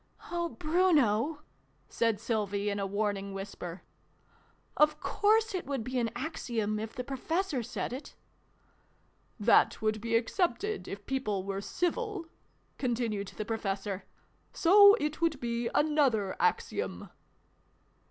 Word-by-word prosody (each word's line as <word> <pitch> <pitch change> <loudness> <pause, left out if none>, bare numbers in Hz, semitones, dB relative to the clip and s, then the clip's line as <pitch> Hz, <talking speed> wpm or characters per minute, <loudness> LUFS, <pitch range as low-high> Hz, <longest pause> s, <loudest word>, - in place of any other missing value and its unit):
" - - -15
Oh, 345 -1 -1
Bruno! 305 - +2 0.2
" - - -38
said 225 -3 0
Sylvie 205 -3 -1
in 200 - -2
a 195 - -1
warning 200 -1 -2
whisper. 190 -3 -7 0.5
" - - -33 0.3
Of 300 0 +4
course 435 +4 +2
it 370 - -3
would 275 -5 -2
be 255 +2 -2
an 230 -1 0
Axiom, 225 -9 -2
if 220 0 -6
the 250 - -3
Professor 285 +3 -1
said 240 +1 -4
it! 265 +4 -8 0.4
" - - -37
" - - -38 0.3
that 215 +2 +4
would 215 -1 0
be 230 0 0
accepted, 370 - 0
if 200 +1 -7
people 215 -8 -1
were 195 0 -3
civil," 365 - -2 0.5
continued 230 -5 -1
the 215 - -3
Professor; 200 -3 -3 0.3
" - - -39
so 405 +4 +9
it 300 -6 -3
would 325 -4 +1
be 235 0 -2
another 275 -10 +2
Axiom." 445 - -1
240 Hz, 140 wpm, -30 LUFS, 210-315 Hz, 0.5 s, so